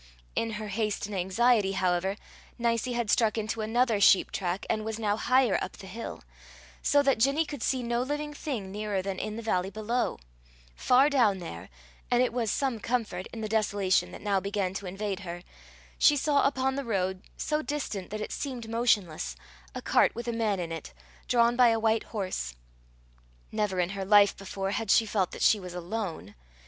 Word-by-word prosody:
In 225 Hz, -1 st, -1 dB
her 210 Hz, 0 st, -5 dB
haste 210 Hz, 0 st, -1 dB
and 210 Hz, -, -7 dB
anxiety, 195 Hz, +2 st, +2 dB
however, 185 Hz, 0 st, +1 dB, 0.4 s
Nicie 235 Hz, +1 st, 0 dB
had 235 Hz, -3 st, 0 dB
struck 225 Hz, -2 st, +3 dB
into 220 Hz, +1 st, -2 dB
another 225 Hz, -1 st, +1 dB
sheep 195 Hz, -, +6 dB
track, 180 Hz, 0 st, -2 dB
and 215 Hz, -, -1 dB
was 220 Hz, 0 st, -3 dB
now 210 Hz, -2 st, 0 dB
higher 255 Hz, -1 st, +3 dB
up 185 Hz, -, -7 dB
the 200 Hz, -, -11 dB
hill; 225 Hz, +4 st, -7 dB, 0.6 s
so 285 Hz, 0 st, +4 dB
that 275 Hz, -4 st, +2 dB
Ginny 275 Hz, +7 st, +3 dB
could 290 Hz, -5 st, -7 dB
see 255 Hz, 0 st, 0 dB
no 235 Hz, 0 st, 0 dB
living 295 Hz, +3 st, -3 dB
thing 240 Hz, -11 st, -4 dB
nearer 205 Hz, -2 st, -2 dB
than 195 Hz, -1 st, -3 dB
in 215 Hz, -, -4 dB
the 230 Hz, -, -6 dB
valley 190 Hz, -4 st, 0 dB
below: 220 Hz, +4 st, -1 dB, 0.6 s
far 255 Hz, -, +4 dB
down 240 Hz, -9 st, +3 dB
there 95 Hz, -, -8 dB, 0.4 s
and 245 Hz, 0 st, +4 dB
it 250 Hz, -, -1 dB
was 235 Hz, -3 st, 0 dB
some 260 Hz, 0 st, 0 dB
comfort, 215 Hz, -6 st, -2 dB
in 225 Hz, -, -8 dB
the 215 Hz, -, -2 dB
desolation 205 Hz, -3 st, +1 dB
that -, -, -10 dB
now 200 Hz, -2 st, +2 dB
began 195 Hz, -1 st, -2 dB
to 195 Hz, 0 st, -5 dB
invade 195 Hz, +1 st, -3 dB
her 175 Hz, -2 st, -7 dB, 0.6 s
she 295 Hz, -, +6 dB
saw 285 Hz, 0 st, +3 dB
upon 265 Hz, -1 st, 0 dB
the 280 Hz, +1 st, -3 dB
road, 190 Hz, -5 st, -1 dB, 0.2 s
so 305 Hz, 0 st, -1 dB
distant 285 Hz, -11 st, -4 dB
that 215 Hz, +1 st, -5 dB
it -, -, -4 dB
seemed 250 Hz, -5 st, -4 dB
motionless, 205 Hz, -, 0 dB, 0.4 s
a -, -, -5 dB
cart -, -, +3 dB
with 235 Hz, +1 st, -5 dB
a 235 Hz, -, -1 dB
man 220 Hz, -4 st, 0 dB
in 170 Hz, -2 st, -4 dB
it, 160 Hz, -, -7 dB, 0.3 s
drawn 235 Hz, 0 st, +3 dB
by 250 Hz, 0 st, +6 dB
a 225 Hz, -1 st, +3 dB
white 220 Hz, 0 st, +1 dB
horse. 185 Hz, -, -4 dB, 1.0 s
Never 210 Hz, -4 st, -1 dB
in 175 Hz, 0 st, +1 dB
her 195 Hz, 0 st, -4 dB
life 205 Hz, 0 st, +6 dB
before 195 Hz, 0 st, -4 dB
had 220 Hz, +1 st, -2 dB
she 225 Hz, -, +5 dB
felt 200 Hz, -4 st, 0 dB
that -, -, -5 dB
she 215 Hz, -, +5 dB
was 180 Hz, -2 st, -8 dB
alone. 175 Hz, -, -4 dB
215 Hz, 195 wpm, -28 LUFS, 195-240 Hz, 1.0 s, sheep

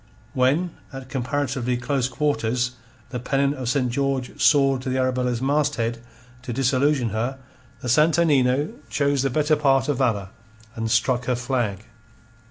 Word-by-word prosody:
When 145 Hz, +8 st, +2 dB, 0.2 s
at 135 Hz, -1 st, -9 dB
comparatively 130 Hz, -1 st, -1 dB
close 130 Hz, 0 st, -1 dB
quarters 125 Hz, -3 st, 0 dB, 0.4 s
the 125 Hz, -, -3 dB
pennon 140 Hz, +3 st, +1 dB
of 130 Hz, -4 st, -4 dB
St. 125 Hz, -2 st, +1 dB
George 135 Hz, -1 st, -2 dB
soared 135 Hz, -3 st, +4 dB
to 130 Hz, -, -4 dB
the 130 Hz, -, -1 dB
Arabella's 125 Hz, -1 st, 0 dB
masthead 135 Hz, -5 st, 0 dB, 0.4 s
to 130 Hz, -, -6 dB
disillusion 135 Hz, 0 st, +1 dB
her, 120 Hz, +5 st, -2 dB, 0.4 s
the -, -, -5 dB
Santo 155 Hz, +7 st, +4 dB
Nino 140 Hz, -2 st, +2 dB, 0.2 s
chose 140 Hz, -2 st, +1 dB
the 135 Hz, -, +1 dB
better 150 Hz, +3 st, +2 dB
part 135 Hz, -2 st, +2 dB
of 140 Hz, -3 st, 0 dB
valour, 105 Hz, -7 st, 0 dB, 0.4 s
and 115 Hz, -1 st, -3 dB
struck 120 Hz, +2 st, +1 dB
her 125 Hz, -, +1 dB
flag. 120 Hz, -5 st, -2 dB
130 Hz, 150 wpm, -23 LUFS, 125-140 Hz, 0.4 s, soared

